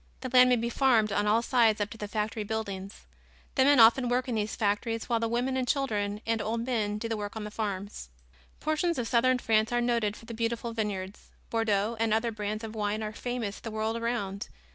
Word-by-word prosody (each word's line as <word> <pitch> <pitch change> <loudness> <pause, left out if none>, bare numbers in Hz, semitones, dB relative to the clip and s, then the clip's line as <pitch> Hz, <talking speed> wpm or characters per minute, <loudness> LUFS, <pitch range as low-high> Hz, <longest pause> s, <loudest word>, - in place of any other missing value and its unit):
The 255 - -4
land 250 0 +7
may 250 - +5
be 235 0 -2
farmed 235 -6 +3
on 205 +1 +1
all 225 +3 +3
sides 230 -4 +3
up 205 0 -2
to 225 - -8
the 210 - -4
factory 215 +1 -2
buildings. 200 -2 -5 0.5
The 265 - +4
men 285 -1 +5
often 235 +2 +6
work 250 +1 0
in 250 - -2
these 215 -1 -1
factories 220 +2 -1
while 235 -2 +1
the 230 - 0
women 245 +3 0
and 255 -1 -1
children 210 -7 -1
and 225 -1 0
old 230 +1 -2
men 215 -5 -1
do 230 - -4
the 225 - -1
work 205 0 -5
on 220 - -4
the 210 - -6
farms. 200 - -4 0.5
Portions 310 +2 0
of 240 -2 -2
southern 255 +2 +3
France 220 -2 +1
are 240 - +2
noted 235 -3 0
for - - -14
the 230 - -7
beautiful 230 +1 -2
vineyards. 205 -3 -4 0.2
Bordeaux 225 -1 +1
and 225 -1 +2
other 230 +1 0
brands 215 0 -4
of 220 -1 -6
wine 210 0 -2
are 215 0 -4
famous 235 -3 -4
the 225 - -6
world 220 +1 -2
around. 230 -4 -3
225 Hz, 225 wpm, -29 LUFS, 210-240 Hz, 0.5 s, land